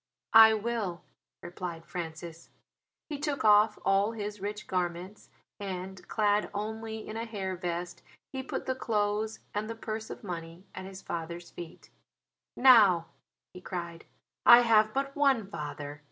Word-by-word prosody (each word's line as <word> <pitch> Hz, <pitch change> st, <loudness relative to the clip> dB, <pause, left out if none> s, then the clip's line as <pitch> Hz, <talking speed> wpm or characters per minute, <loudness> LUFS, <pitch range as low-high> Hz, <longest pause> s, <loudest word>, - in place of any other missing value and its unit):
"I 220 Hz, 0 st, +9 dB
will," 215 Hz, -5 st, -3 dB, 0.4 s
replied 175 Hz, -2 st, -6 dB
Francis. 165 Hz, -1 st, -7 dB, 0.6 s
He 295 Hz, -3 st, -5 dB
took 290 Hz, -4 st, -2 dB
off 210 Hz, 0 st, +6 dB
all 195 Hz, +3 st, +3 dB
his 210 Hz, -2 st, -5 dB
rich 210 Hz, +1 st, -4 dB
garments; 180 Hz, +2 st, -3 dB, 0.3 s
and, 190 Hz, -1 st, -6 dB
clad 210 Hz, -1 st, +1 dB
only 220 Hz, +1 st, -5 dB
in 215 Hz, -, -5 dB
a 230 Hz, -, -3 dB
hair 195 Hz, -4 st, -4 dB
vest, 175 Hz, 0 st, -4 dB, 0.3 s
he 265 Hz, -, -3 dB
put 265 Hz, -, -5 dB
the 260 Hz, -, 0 dB
clothes 215 Hz, -3 st, -1 dB
and 210 Hz, +1 st, -2 dB
the 230 Hz, -, -4 dB
purse 220 Hz, -1 st, -5 dB
of -, -, -8 dB
money 170 Hz, -1 st, -7 dB
at 185 Hz, -, -7 dB
his 190 Hz, 0 st, -10 dB
father's 170 Hz, +1 st, -6 dB
feet. 170 Hz, -2 st, -11 dB, 0.7 s
"Now," 205 Hz, -10 st, +6 dB, 0.4 s
he 180 Hz, -, -10 dB
cried, 170 Hz, -2 st, -6 dB, 0.4 s
"I 240 Hz, 0 st, +9 dB
have 220 Hz, -2 st, +4 dB
but 275 Hz, +2 st, -2 dB
one 275 Hz, -7 st, +3 dB
father. 145 Hz, -4 st, -6 dB
205 Hz, 145 wpm, -29 LUFS, 175-220 Hz, 0.7 s, I